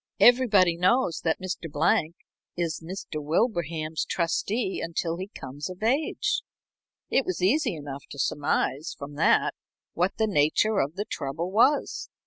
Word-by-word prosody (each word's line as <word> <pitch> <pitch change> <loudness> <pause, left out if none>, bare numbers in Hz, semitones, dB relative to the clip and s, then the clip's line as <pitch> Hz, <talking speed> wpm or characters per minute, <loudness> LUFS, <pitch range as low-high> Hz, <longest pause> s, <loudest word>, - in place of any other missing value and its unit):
Everybody 210 -9 +5
knows 185 +2 +2
that 160 -1 0
Mr. 185 -4 -5
Blank 155 +2 +2 0.4
is 165 -2 -2
Mr. 170 -3 -6
Wilbraham's 160 - 0
trustee 190 +4 -1
until 165 0 -2
he 190 +2 -5
comes 145 -5 -7
of 185 +3 -8
age. 270 +7 +1 0.7
It 270 - +3
was 185 -3 -3
easy 235 - +2
enough 145 -2 -8
to - - -9
surmise 145 +3 -1
from 140 +1 -8
that - - +3 0.4
what 180 +3 0
the 220 - +2
nature 195 +4 +2
of 145 +4 -1
the 205 +2 -3
trouble 160 +4 -4
was. 250 +8 +2
175 Hz, 140 wpm, -26 LUFS, 155-205 Hz, 0.7 s, Everybody